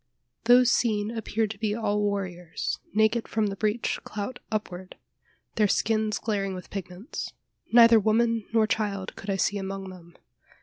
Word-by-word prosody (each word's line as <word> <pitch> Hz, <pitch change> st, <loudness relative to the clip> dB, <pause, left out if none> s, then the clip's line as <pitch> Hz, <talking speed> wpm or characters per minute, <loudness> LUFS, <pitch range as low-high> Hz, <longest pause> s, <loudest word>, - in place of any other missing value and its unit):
Those 245 Hz, +1 st, +6 dB
seen 215 Hz, -2 st, +1 dB
appeared 225 Hz, -1 st, -1 dB
to 205 Hz, -, -10 dB
be 210 Hz, -1 st, 0 dB
all 210 Hz, -2 st, 0 dB
warriors, 185 Hz, -4 st, -3 dB
naked 220 Hz, +2 st, +2 dB
from 220 Hz, -1 st, 0 dB
the 200 Hz, -1 st, -2 dB
breech 215 Hz, +3 st, -1 dB
clout 215 Hz, +4 st, -5 dB
upward, 190 Hz, -4 st, -4 dB, 0.6 s
their 210 Hz, -2 st, +4 dB
skins 215 Hz, +1 st, +1 dB
glaring 200 Hz, -3 st, -2 dB
with 180 Hz, -, -10 dB
pigments. 190 Hz, -, -6 dB, 0.4 s
Neither 230 Hz, -1 st, +8 dB
woman 225 Hz, +1 st, +1 dB
nor 225 Hz, -1 st, +4 dB
child 205 Hz, -3 st, -2 dB
could 205 Hz, -, -9 dB
I 195 Hz, -, +1 dB
see 200 Hz, +2 st, 0 dB
among 195 Hz, 0 st, -5 dB
them. 170 Hz, -2 st, -14 dB
210 Hz, 155 wpm, -27 LUFS, 195-225 Hz, 0.6 s, Neither